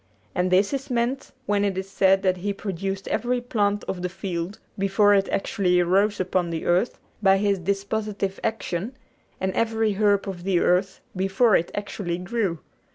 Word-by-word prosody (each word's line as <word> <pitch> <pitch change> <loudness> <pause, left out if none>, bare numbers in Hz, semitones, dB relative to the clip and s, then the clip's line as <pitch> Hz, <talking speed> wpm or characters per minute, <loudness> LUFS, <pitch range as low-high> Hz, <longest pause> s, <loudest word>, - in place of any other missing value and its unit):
And 180 +1 +1
this 195 +7 +3
is 275 0 -3
meant 245 +2 -1
when 205 -2 +1
it 195 -2 0
is 190 0 -3
said 195 0 +3
that 185 -1 +2
He 200 +3 -2
produced 195 0 -4
every 245 +2 0
plant 205 -4 0
of 180 - -4
the 180 - -2
field 180 +1 -4 0.2
before 195 +1 +3
it 195 -1 +2
actually 180 -2 +1
arose 195 +4 +2
upon 185 -1 0
the 165 -1 -4
earth 180 +7 +2 0.2
by 195 -2 +5
His 200 -1 +1
dispositive 200 +1 -2
action, 220 +2 -3 0.4
and 190 0 -1
every 225 -1 +1
herb 205 0 +2
of 180 -3 -5
the 185 -2 +2
earth 185 +3 +1
before 195 +4 +3
it 165 - +1
actually 195 -4 -3
grew. 190 -1 -1
195 Hz, 170 wpm, -24 LUFS, 185-210 Hz, 0.4 s, by